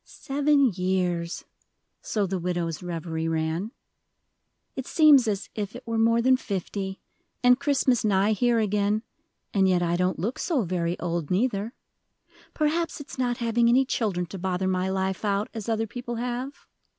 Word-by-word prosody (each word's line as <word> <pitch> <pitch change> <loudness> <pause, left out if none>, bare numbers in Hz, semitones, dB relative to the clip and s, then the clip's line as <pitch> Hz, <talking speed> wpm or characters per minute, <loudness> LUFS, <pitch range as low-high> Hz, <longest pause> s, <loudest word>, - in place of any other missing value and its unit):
"Seven 280 -2 +1
years," 180 -2 -1 0.6
so 210 -2 -1
the 190 0 -2
widow's 170 -2 -2
reverie 165 -2 -3
ran; 160 +5 -1 1.1
"it 265 - -5
seems 295 -6 +6
as 200 -2 -1
if 205 -1 -4
it - - -9
were 230 -1 -1
more 230 +1 +3
than 260 +1 +5
fifty, 195 -2 -4 0.4
and 250 +1 +6
Christmas 275 -4 +2
nigh 205 0 +3
here 235 +3 +2
again, 210 0 +1 0.5
and 190 -2 +3
yet 180 -1 +2
I 170 0 +1
don't 180 0 0
look 215 +10 -3
so 295 -9 0
very 175 -1 -2
old 170 -3 -2
neither. 210 +2 0 0.8
Perhaps 320 +2 0
it's 280 -2 -9
not 245 -1 0
having 235 -1 +2
any 260 +3 +4
children 200 -8 -1
to 185 +3 -8
bother 185 +1 -1
my 185 0 0
life 190 0 -2
out, 205 0 0
as 225 -1 -5
other 225 0 +1
people 240 +2 -6
have. 245 +3 -4
205 Hz, 160 wpm, -26 LUFS, 180-245 Hz, 1.1 s, seems